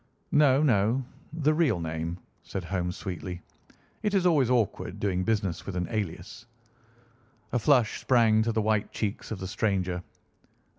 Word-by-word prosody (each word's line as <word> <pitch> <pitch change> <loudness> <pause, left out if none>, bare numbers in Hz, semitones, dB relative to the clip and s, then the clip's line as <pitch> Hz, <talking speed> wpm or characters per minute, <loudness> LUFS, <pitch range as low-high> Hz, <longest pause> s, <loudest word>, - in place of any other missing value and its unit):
"No, 145 -1 +5
no; 120 0 +2 0.3
the 155 -1 +1
real 150 - +2
name," 80 +1 -3 0.2
said 95 - -5
Holmes 90 0 -2
sweetly. 90 -2 -5 0.6
"It 210 -1 0
is 185 -2 +2
always 150 -8 +4
awkward 120 -5 0
doing 95 -2 0
business 100 -5 -1
with 100 - -4
an 90 0 -1
alias." 105 +2 -4 1.0
A 125 - +1
flush 125 -2 +3
sprang 115 -4 +4
to 115 +1 +1
the 110 -1 0
white 110 -1 +1
cheeks 105 -2 -3
of 110 - -4
the 95 - -6
stranger. 95 -2 -1
110 Hz, 150 wpm, -28 LUFS, 90-125 Hz, 1.0 s, No